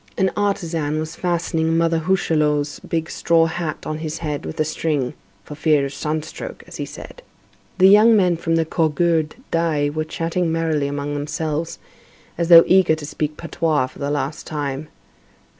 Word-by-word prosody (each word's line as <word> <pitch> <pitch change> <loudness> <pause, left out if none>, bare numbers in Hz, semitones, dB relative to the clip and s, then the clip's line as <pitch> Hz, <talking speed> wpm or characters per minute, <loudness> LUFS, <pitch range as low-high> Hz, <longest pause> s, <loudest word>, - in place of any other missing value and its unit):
An 190 -1 +2
artisan 165 -7 -1
was 155 +1 -4
fastening 165 -2 0
Mother 165 0 +2
Hucheloup's 155 -4 0
big 160 -1 -3
straw 165 -1 +3
hat 165 -2 -4
on 155 0 -3
his 155 -1 -4
head 150 -3 -4
with - - -7
a - - +4
string, 150 -4 -1 0.3
"for - - -9
fear 150 -2 +2
of 140 - -6
sun 155 +1 -2
stroke," - - -8
as - - -10
he - - -3
said. - - -11 0.6
The 185 - +5
young 215 +3 +7
men 180 -4 +3
from 165 0 -1
the 165 -1 +2
Cougourde 160 0 +1 0.2
d'Aix 155 -3 0
were 155 - 0
chatting 165 +2 -2
merrily 160 -3 0
among 145 +1 -3
themselves, 155 +2 -3 0.6
as 170 0 -2
though 170 -1 +10
eager 185 -4 +4
to 155 -1 -8
speak 150 0 -3
patois 160 -4 0
for 130 - -13
the 140 - -2
last 145 +1 -3
time. 145 -1 -4
160 Hz, 175 wpm, -21 LUFS, 150-170 Hz, 0.6 s, though